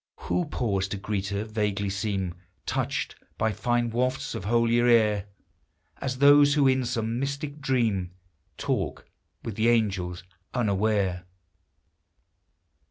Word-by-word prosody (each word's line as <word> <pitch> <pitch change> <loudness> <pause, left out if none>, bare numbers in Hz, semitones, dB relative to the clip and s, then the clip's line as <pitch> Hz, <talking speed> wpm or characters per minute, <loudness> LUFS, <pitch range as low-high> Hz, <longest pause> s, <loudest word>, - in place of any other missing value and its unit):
Who 175 - 0
pause 100 -9 -1
to 100 - -4
greet 100 -1 -3
her, 100 +1 -2
vaguely 105 -2 -1
seem 95 -3 -2 0.3
Touched - - -2 0.3
bv 110 0 +1
fine 120 0 0
wafts 130 +4 -1
of 95 - -5
holier 120 +2 +3
air; 105 -4 +4 0.7
As 130 -1 -3
those 145 +1 +6
who 145 -2 +4
in 130 -1 +2
some 115 0 -1
mystic 140 +2 -3
dream 115 -10 0 0.5
Talk - - -2 0.4
with 115 - -4
the 110 +2 +3
angels 95 -7 0 0.3
unaware 100 -5 +1
110 Hz, 120 wpm, -27 LUFS, 100-130 Hz, 0.7 s, those